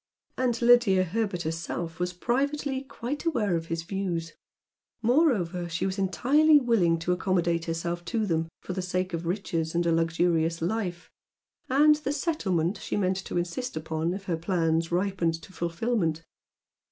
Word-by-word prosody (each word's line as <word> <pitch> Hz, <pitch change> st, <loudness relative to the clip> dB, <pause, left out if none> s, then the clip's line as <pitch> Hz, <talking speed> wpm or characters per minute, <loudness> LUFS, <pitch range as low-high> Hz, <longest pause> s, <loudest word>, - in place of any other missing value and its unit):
And 245 Hz, -2 st, 0 dB
Lydia 235 Hz, -6 st, +5 dB
Herbert 190 Hz, -1 st, -2 dB
herself 165 Hz, +1 st, -4 dB
was 180 Hz, 0 st, 0 dB
privately 270 Hz, +7 st, -1 dB
quite 270 Hz, +1 st, -5 dB
aware 220 Hz, -, +1 dB
of 165 Hz, 0 st, -3 dB
his 165 Hz, 0 st, -3 dB
views. 170 Hz, -3 st, -3 dB, 0.7 s
Moreover 220 Hz, -, +2 dB
she 165 Hz, +2 st, -2 dB
was 190 Hz, +1 st, -2 dB
entirely 290 Hz, -, +4 dB
willing 215 Hz, -10 st, +2 dB
to 165 Hz, +2 st, -2 dB
accommodate 175 Hz, -2 st, +1 dB
herself 170 Hz, +1 st, -3 dB
to 215 Hz, +6 st, -1 dB
them 165 Hz, -3 st, 0 dB
for 185 Hz, -, -5 dB
the 185 Hz, -, -2 dB
sake 185 Hz, 0 st, -2 dB
of 170 Hz, 0 st, -3 dB
riches 170 Hz, -3 st, -2 dB
and 170 Hz, 0 st, +1 dB
a 170 Hz, -, +3 dB
luxurious 165 Hz, 0 st, +1 dB
life, 180 Hz, -1 st, -3 dB, 0.6 s
and 300 Hz, +3 st, +5 dB
the 295 Hz, -2 st, -2 dB
"settlement" 200 Hz, -, 0 dB
she -, -, -3 dB
meant 185 Hz, -2 st, +1 dB
to 190 Hz, -, -4 dB
insist 175 Hz, +5 st, -3 dB
upon 160 Hz, +2 st, -2 dB
if 195 Hz, -, -7 dB
her 175 Hz, -4 st, -2 dB
plans 165 Hz, -1 st, 0 dB
ripened 175 Hz, -3 st, 0 dB
to 190 Hz, -, -13 dB
fulfilment. 170 Hz, -1 st, -1 dB
180 Hz, 155 wpm, -27 LUFS, 165-225 Hz, 0.7 s, Lydia